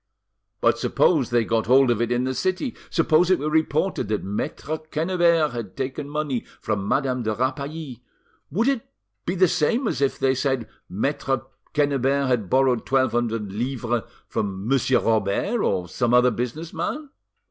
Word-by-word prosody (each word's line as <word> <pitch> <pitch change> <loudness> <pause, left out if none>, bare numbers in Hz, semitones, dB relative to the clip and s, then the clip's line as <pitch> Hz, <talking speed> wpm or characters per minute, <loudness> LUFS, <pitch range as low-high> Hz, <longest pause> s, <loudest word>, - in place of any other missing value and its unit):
"But - - +3
suppose 150 -9 +2
they 120 -1 +2
got 115 0 0
hold 130 0 +5
of 115 -1 0
it 120 - 0
in 120 +1 +1
the 130 0 -1
city, 185 - -1
suppose 165 +1 +3
it 185 - +5
were 150 +1 -2
reported 160 - +1
that 105 -1 -1
Maitre 140 +10 -3
Quennebert 165 0 +1
had 115 -5 -6
taken 135 +2 -4
money 145 -5 -2 0.2
from 100 -1 -2
Madame 130 -1 +1
de 110 -2 -1
Rapally, 140 +1 -3 0.5
would 220 - 0
it 275 -5 0 0.4
be 180 - 0
the 185 0 +5
same 225 - +1
as 140 - -2
if 140 - +1
they 130 -1 +2
said 130 -2 -1 0.2
Maitre 135 +5 -1 0.3
Quennebert 140 -1 +2
had 120 -7 0
borrowed 130 -3 +3
twelve 130 0 +2
hundred 115 -4 -1
livres 120 +1 -1 0.3
from 100 0 -3
Monsieur 130 0 +2
Robert 110 - +1
or 90 -2 0
some 120 +6 +1
other 125 0 +5
business 125 - -4
man?" 275 - -4
135 Hz, 165 wpm, -24 LUFS, 120-155 Hz, 0.5 s, hold